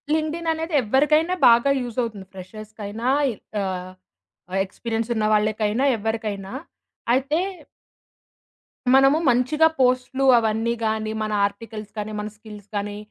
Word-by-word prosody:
LinkedIn 320 Hz, +1 st, -2 dB
అనేది 320 Hz, +1 st, -5 dB
ఎవరికైనా 300 Hz, +9 st, +3 dB
బాగా 235 Hz, +4 st, +5 dB
యూజవుతుంది. 230 Hz, -4 st, -4 dB
ఫ్రెషర్స్‌కి 215 Hz, +3 st, -10 dB
అయినా, 220 Hz, +4 st, -4 dB, 0.5 s
ఆహ్, 185 Hz, -1 st, -4 dB, 0.6 s
ఆ -, -, -4 dB
ఎక్స్‌పీరియన్స్ 225 Hz, +3 st, -4 dB
ఉన్న 215 Hz, -, 0 dB
వాళ్ళకైనా, 215 Hz, +3 st, +1 dB
ఎవరికైనా. 210 Hz, -3 st, -3 dB, 0.6 s
అయితే 275 Hz, +4 st, +1 dB, 1.6 s
మనము 270 Hz, +2 st, +6 dB
మంచిగా 255 Hz, +6 st, +3 dB
పోస్ట్లు 255 Hz, +1 st, +1 dB
అవన్నీ 225 Hz, +1 st, +1 dB
గానీ, 220 Hz, 0 st, -1 dB
మన 215 Hz, -, -2 dB
ఆర్టికల్స్ 215 Hz, 0 st, -6 dB
కానీ, 210 Hz, +1 st, -4 dB
మన 210 Hz, -, -3 dB
స్కిల్స్ 210 Hz, -2 st, -12 dB
కానీ 205 Hz, 0 st, -3 dB
225 Hz, 115 wpm, -23 LUFS, 210-260 Hz, 1.6 s, మనము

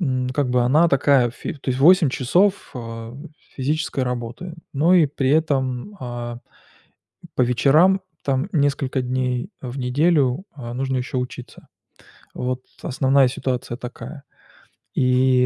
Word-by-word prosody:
м, 130 Hz, -6 st, 0 dB
как 130 Hz, -1 st, -1 dB
бы 125 Hz, 0 st, +3 dB
она 150 Hz, +8 st, +4 dB
такая, 135 Hz, -3 st, +3 dB
ф 115 Hz, -, -14 dB
то 140 Hz, -2 st, -4 dB
есть 130 Hz, -, -1 dB
8 175 Hz, +2 st, +6 dB
часов, 180 Hz, +10 st, +1 dB
а, 115 Hz, -1 st, -7 dB, 0.4 s
физической 145 Hz, +1 st, -1 dB
работы, 125 Hz, +7 st, -5 dB, 0.2 s
но 160 Hz, +6 st, +3 dB
и 170 Hz, -4 st, +6 dB
при 135 Hz, -1 st, -1 dB
этом, 140 Hz, +3 st, 0 dB
а, 120 Hz, -1 st, -5 dB, 1.0 s
по -, -, +2 dB
вечерам 150 Hz, +10 st, +4 dB, 0.2 s
там 135 Hz, -1 st, 0 dB
несколько 140 Hz, -3 st, 0 dB
дней 125 Hz, +4 st, -2 dB
в 125 Hz, +1 st, -6 dB
неделю, 140 Hz, +3 st, +2 dB
а, 120 Hz, -5 st, -7 dB
нужно 130 Hz, +1 st, -1 dB
еще 130 Hz, +1 st, -2 dB
учиться. 125 Hz, 0 st, -7 dB, 0.7 s
Вот 125 Hz, 0 st, -3 dB, 0.2 s
основная 135 Hz, +1 st, +3 dB
ситуация 125 Hz, -2 st, -3 dB
такая. 125 Hz, +4 st, -9 dB, 0.7 s
И, 125 Hz, 0 st, +3 dB
130 Hz, 130 wpm, -22 LUFS, 125-145 Hz, 1.0 s, 8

